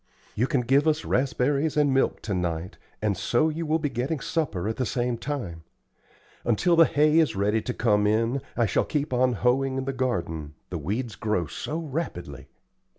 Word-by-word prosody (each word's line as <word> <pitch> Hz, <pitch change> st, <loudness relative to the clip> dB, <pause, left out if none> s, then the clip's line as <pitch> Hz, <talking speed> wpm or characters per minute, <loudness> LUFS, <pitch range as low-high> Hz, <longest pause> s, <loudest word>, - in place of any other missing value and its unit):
"You 120 Hz, +5 st, +1 dB
can 135 Hz, -, +1 dB
give 135 Hz, +5 st, +3 dB
us 155 Hz, 0 st, +1 dB
raspberries 140 Hz, +3 st, +1 dB
and 145 Hz, -2 st, +3 dB
milk 135 Hz, -, +1 dB
to 105 Hz, -, -2 dB
night, 90 Hz, 0 st, -3 dB, 0.2 s
and 105 Hz, -2 st, +1 dB
so 140 Hz, +11 st, +2 dB
you 160 Hz, +1 st, -3 dB
will 155 Hz, +1 st, +3 dB
be 150 Hz, -, -1 dB
getting 135 Hz, +5 st, -2 dB
supper 125 Hz, -, -2 dB
at 110 Hz, -, -2 dB
the 130 Hz, -, 0 dB
same 120 Hz, 0 st, -1 dB
time. 115 Hz, -, -5 dB, 0.8 s
Until 170 Hz, +10 st, +2 dB
the 165 Hz, 0 st, +7 dB
hay 150 Hz, +2 st, +3 dB
is 145 Hz, -10 st, +2 dB
ready 105 Hz, +3 st, +1 dB
to 125 Hz, -, -3 dB
come 105 Hz, -4 st, +2 dB
in, 115 Hz, +5 st, +1 dB, 0.2 s
I 120 Hz, -, +3 dB
shall -, -, +1 dB
keep 150 Hz, -3 st, -2 dB
on 125 Hz, 0 st, +3 dB
hoeing 130 Hz, +4 st, +1 dB
in 130 Hz, -, -2 dB
the 135 Hz, -, -2 dB
garden, 85 Hz, -, -2 dB, 0.2 s
the 85 Hz, -, -3 dB
weeds 110 Hz, -, -3 dB
grow 105 Hz, -5 st, -1 dB
so 150 Hz, -, -5 dB
rapidly. 110 Hz, -, -5 dB
125 Hz, 190 wpm, -26 LUFS, 105-145 Hz, 0.8 s, the